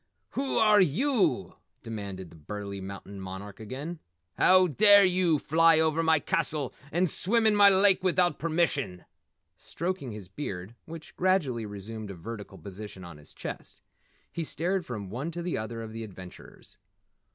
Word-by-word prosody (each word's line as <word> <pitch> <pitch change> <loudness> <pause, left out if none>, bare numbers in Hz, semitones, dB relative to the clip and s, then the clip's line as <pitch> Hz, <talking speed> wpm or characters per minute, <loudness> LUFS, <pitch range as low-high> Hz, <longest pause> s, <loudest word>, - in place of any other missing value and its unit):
"Whew 270 0 -1
are 210 -2 +6
yew?" 195 - +1 0.3
demanded 100 -6 -6
the - - -14
burly 100 +5 -7
mountain 100 +1 -8
monarch 95 +2 -8
again. 140 +10 -6 0.4
"How 185 0 +6
dare 205 +4 +6
yew 180 -3 +2
fly 165 +2 +4
over 160 0 +2
my 160 -1 +4
castle 145 -1 -1 0.2
and 175 +3 +2
swim 220 +7 +1
in 215 -1 +4
my 205 -1 +8
lake 195 -1 +4
without 180 -1 +2
permission?" 150 - -1 0.5
Stroking 170 -7 -4
his 105 -3 -8
beard 95 -3 -6
which 160 -1 -10
gradually 150 - +1
resumed 105 +1 -7
a 100 - -7
vertical 105 +5 -8
position 100 -1 -9
on 85 -3 -10
his 75 - -13
chest, - - -7 0.5
he 170 - -3
stared 175 +4 -1
from 105 -6 -6
one 130 +8 -3
to 170 +1 -5
the 175 - -2
other 115 +1 -5
of 110 -1 -8
the 115 0 -5
adventurers. 95 -4 -12
145 Hz, 155 wpm, -28 LUFS, -, 0.5 s, my